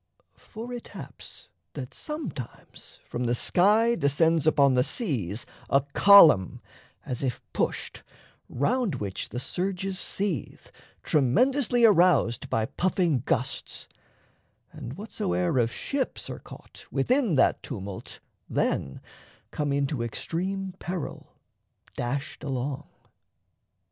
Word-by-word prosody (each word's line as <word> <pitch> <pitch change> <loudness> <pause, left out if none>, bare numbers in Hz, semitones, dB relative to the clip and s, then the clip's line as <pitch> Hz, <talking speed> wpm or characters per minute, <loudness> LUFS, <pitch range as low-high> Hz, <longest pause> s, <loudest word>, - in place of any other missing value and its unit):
For 235 +2 -9
it 240 - -7
haps - - -10 0.3
that - - -7
sometimes 300 - -7
from 125 +1 -3
the 120 +1 +1
sky 210 - +3
descends 160 - +2
Upon 140 -3 +5
the 125 0 +4
seas 120 - -1 0.2
a 140 - +4
column, 165 - +7 0.5
as 125 - -3
if 130 -4 -2
pushed, - - -2 0.5
Round 215 - 0
which 100 -5 -4
the 120 - -4
surges 190 +5 -3
seethe, 190 - -3 0.3
tremendously 240 - +3
Aroused 175 - +4
by 110 - +1
puffing 175 - 0
gusts; 125 0 -2 0.8
and 120 - -8
whatso'er 90 - -1
Of 115 -1 +2
ships 275 - -3
are - - -7
caught - - -13
within 250 - +1
that 135 - +3
tumult 95 -2 -7 0.3
then 65 - -1 0.5
Come 150 -2 -2
into 140 -2 0
extreme 185 - -3
peril, 175 -3 -6 0.6
dashed 135 +3 -4
along. 135 0 -3
150 Hz, 110 wpm, -27 LUFS, 125-200 Hz, 0.8 s, column